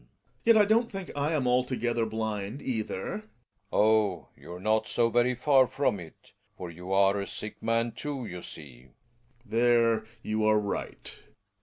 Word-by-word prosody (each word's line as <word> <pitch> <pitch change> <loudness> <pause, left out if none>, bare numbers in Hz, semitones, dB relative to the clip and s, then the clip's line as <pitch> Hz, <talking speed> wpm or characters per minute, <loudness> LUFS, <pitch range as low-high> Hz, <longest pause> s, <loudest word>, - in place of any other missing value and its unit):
Gregers. - - -35 0.3
Yet 230 -1 +7
I 210 - +6
don't 230 +3 +2
think 195 -2 -6
I 145 +3 0
am 145 -5 0
altogether 125 -2 +1
blind 110 +1 -3
either. 110 -6 -3 0.2
Relling. 105 - -25 0.4
Oh! 105 -3 +2
you're 90 +1 -10
not 110 +2 +1
so 120 -1 +2
very 120 +2 +2
far 130 0 +4
from 135 -8 0
it. 80 -3 -14 0.3
For 90 -2 -6
you 90 +3 -9
are 100 +1 +4
a 100 - -4
sick 105 - -7
man 115 +1 +1
too, 140 0 -5
you 90 -4 -7
see. 65 -7 -10
Gregers. 60 - -29 0.5
There 115 -1 +3 0.2
you 110 0 -1
are 110 0 +4
right. 105 -1 -4
110 Hz, 170 wpm, -28 LUFS, 100-125 Hz, 0.5 s, Yet